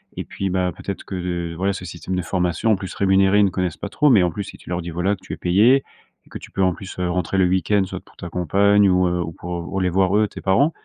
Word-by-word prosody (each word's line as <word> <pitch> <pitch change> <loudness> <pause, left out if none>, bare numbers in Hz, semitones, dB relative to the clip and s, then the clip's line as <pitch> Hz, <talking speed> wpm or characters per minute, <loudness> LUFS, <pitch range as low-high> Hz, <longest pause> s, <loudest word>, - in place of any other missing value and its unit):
Et - - -4
puis 95 -1 -4
bah, 90 -1 0
peut-être 100 - -6
que, 85 -3 -4
voilà, 95 +3 0
ce 90 - -7
système 90 +2 -5
de 90 - 0
formation, 90 +5 0
en - - +3
plus 95 -1 -7
rémunéré, 95 +1 +3
ils 105 - +6
ne 95 - +2
connaissent 90 -2 -2
pas 100 - -6
trop. 145 +6 +3
Mais 105 -6 +6
en 90 - +2
plus, 100 +5 -5
si - - -11
tu - - -14
leur 90 -1 -2
dis 85 - -6
voilà, 90 +5 0
que 95 - -23
tu - - -7
es - - -6
payé 110 +10 +4 0.4
et - - -23
que - - -7
tu - - -13
peux 95 - -2
en 90 -2 +3
plus, 95 -1 -9
heu, 90 -1 0
rentrer 90 +2 -1
le 95 - +5
week-end 95 +2 +2
soit 95 - -6
pour - - -23
ta 85 - -8
compagne 100 +4 +3
ou, 90 0 +3
heu 90 0 -1
ou 85 - -5
pour, 85 +3 -5
heu, 95 - 0
les 90 - +2
voir, 95 +2 +2
eux, 105 0 +3
tes - - -10
parents, 135 +12 +3
95 Hz, 300 wpm, -21 LUFS, 90-100 Hz, 0.4 s, ils